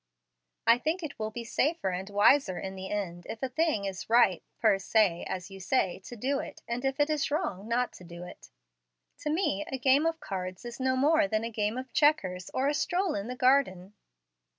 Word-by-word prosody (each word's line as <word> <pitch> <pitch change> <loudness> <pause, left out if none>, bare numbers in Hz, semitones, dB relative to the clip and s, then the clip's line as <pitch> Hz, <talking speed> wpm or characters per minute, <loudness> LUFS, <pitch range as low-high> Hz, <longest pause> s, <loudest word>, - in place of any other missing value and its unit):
I 230 +1 +6
think 325 +6 -1
it 295 -3 -6
will 215 0 -2
be 235 +2 -6
safer 290 - 0
and 185 +2 -4
wiser 205 0 +4
in 190 - -5
the 190 0 -7
end, 175 -4 -4
if 225 - -6
a 265 - 0
thing 295 -7 0
is 195 +1 -5
right 225 -7 +4 0.2
fer 210 -4 +3
se, 195 -3 +2
as 185 +1 -5
you 195 - -9
say, 190 -2 0
to 245 - -8
do 270 +5 -1
it, - - -8
and 235 +2 -3
if 270 0 0 0.3
wrong 285 - -2
not 245 +2 0
to - - -13
do 170 0 -9
it. 180 - -12 0.7
To 300 - -3
me, 300 - 0
a 265 - -1
game 270 +5 +4
of 325 0 -2
cards 185 - -5
is 240 +1 -7
no 260 0 +1
more 300 +3 +4
than 215 -4 0
a 230 - -3
game 215 +1 -1
of 255 -1 -7
checkers, 195 -13 +2
or 265 +2 0
a 290 - +2
stroll 355 +5 0
in 200 +3 -4
a 250 - -4
garden." 250 -8 +2
235 Hz, 210 wpm, -29 LUFS, 195-275 Hz, 0.7 s, I